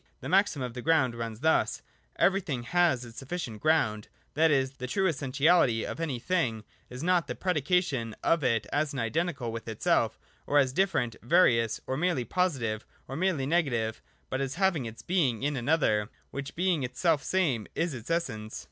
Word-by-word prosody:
The 130 - -6
maxim 185 -7 +2
of 125 -2 -4
the 125 - -6
Ground 145 -5 +2
runs 115 -1 -6
thus: 160 +1 +2 0.3
Everything 180 -10 +1
has 160 -3 +2
its 115 0 -10
Sufficient 135 -7 -5
Ground: 110 -10 +1 0.3
that 160 +2 +4
is, 135 -3 +2
the 125 - -5
true 195 +8 0
essentiality 140 -4 +2
of - - -6
any 155 -6 -2
thing 120 -7 -1 0.3
is 125 +3 -7
not 180 -1 +2
the - - -4
predication 150 - 0
of 165 -2 +2
it 115 -4 +1
as 145 -1 0
identical 135 +1 -1
with 115 0 -7
itself, 110 -2 +1 0.3
or 145 - +2
as 135 -3 +3
different 175 - 0
(various), 120 - +3
or 130 - -2
merely 160 -6 0
positive, 130 - -1 0.2
or 135 - -6
merely 165 -5 0
negative, 130 -9 0 0.3
but 130 - -1
as 135 -1 -2
having 175 -9 +1
its 110 0 -10
Being 140 - +1
in 145 0 0
an 125 +1 -3
other, 110 -10 +2 0.2
which, 140 0 -6
being 180 -3 +1
its 125 -1 -5
selfsame, 160 - +1
is 165 -1 0
its 120 +1 -8
essence. 115 -11 -2
140 Hz, 175 wpm, -29 LUFS, 120-170 Hz, 0.3 s, that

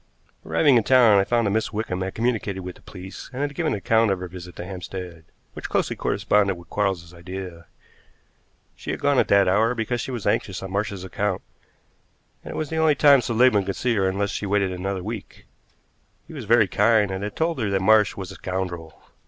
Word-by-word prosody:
Arriving 145 -6 +3
in 115 - +2
town 120 -5 +6
I - - +4
found 120 +2 +1
that 100 - +1
Miss 110 +2 0
Wickham 105 -4 -3
had 95 0 -4
communicated 110 -5 -1
with 90 0 -7
the - - -19
police 95 0 -10
and 135 +2 -3
had 145 0 -2
given 160 0 -1
an - - -1
account 110 +3 +2
of 95 -2 0
her 90 - -5
visit 90 -1 -10
to 85 - -7
Hampstead, 90 -3 -7 0.3
which - - -7
closely - - 0
corresponded 100 -3 +1
with 85 -1 -15
Quarles's 95 -4 -1
idea. 90 -1 -8 1.1
She - - -9
had - - -2
gone - - +2
at - - +2
that 100 -1 +4
hour 110 +6 +2
because 120 +1 -2
she - - -5
was 120 -5 -5
anxious 95 -2 -1
on 95 - -6
Marsh's 100 -1 -2
account, 95 +1 -2 1.0
and - - -9
it - - -6
was 155 -1 -3
the 160 - -2
only 160 -2 +4
time 140 -2 +6
Seligmann 120 -3 +3
could 95 0 -3
see 125 -1 0
her 95 -3 +1
unless 100 +1 -1
she 105 - -4
waited 100 -1 +1
another 95 +1 -3
week. 110 0 -7 0.8
He - - -13
was 135 -7 -7
very 110 -1 +4
kind, 105 +1 +3
and 95 +1 -4
had 105 0 -5
told 160 -2 -1
her 110 -4 0
that 100 -1 +1
Marsh 105 -1 +4
was 95 -2 -6
a - - -10
scoundrel. 90 -4 -5
100 Hz, 220 wpm, -23 LUFS, 95-115 Hz, 1.1 s, town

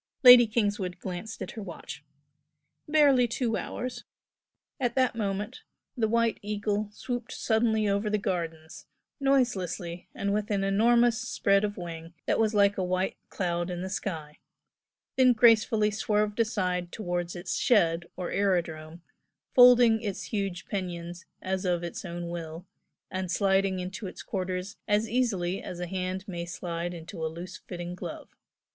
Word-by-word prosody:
Lady 245 -2 +10
Kingswood 205 -5 -1
glanced 185 +4 -6
at - - -7
her 220 - -7
watch. 165 -5 -8 0.8
"Barely 285 -5 +5
two 235 0 -1
hours." 250 +1 -4 0.8
At 245 -3 0
that 260 -1 +3
moment 210 - -3 0.3
the 230 -4 +1
"White 230 0 +1
Eagle" 210 0 -2
swooped 245 +2 -5
suddenly 220 -1 +1
over 200 +1 +1
the 210 - +1
gardens, 165 -5 -4 0.3
noiselessly 195 -11 0
and 200 0 -1
with 210 0 -1
an 200 -2 0
enormous 230 +4 +4
spread 200 0 +2
of 205 -1 -2
wing 165 -1 -7
that - - +1
was 220 -1 +2
like 200 -1 +4
a - - +1
white 185 +1 0
cloud 175 -1 -2
in 180 0 -4
the 190 - -5
sky 160 -6 -5 0.8
then 255 -1 +6
gracefully 220 -2 +4
swerved 210 0 0
aside 180 -6 0
towards 175 -4 -3
its 175 -1 -3
"shed" 170 -7 +3
or 180 -1 -4
aerodrome, 170 -4 -1 0.5
folding 245 -3 +7
its 205 -4 -4
huge 195 -3 -2
pinions 175 -3 -5 0.2
as 190 0 -1
of 175 -2 0
its 170 - -5
own 175 -1 -5
will 165 0 -6 0.5
and 185 -1 -3
sliding 195 0 +2
into 190 +3 -5
its - - -9
quarters 185 +1 -4
as 210 +1 +2
easily 200 -6 0
as 175 - -7
a 180 - -2
hand 185 +2 -4
may 175 -3 -4
slide 170 0 -4
into 165 -1 -7
a - - +1
loose 175 +4 -8
fitting 175 -3 -7
glove. 180 - -7
195 Hz, 150 wpm, -28 LUFS, 175-220 Hz, 0.8 s, Lady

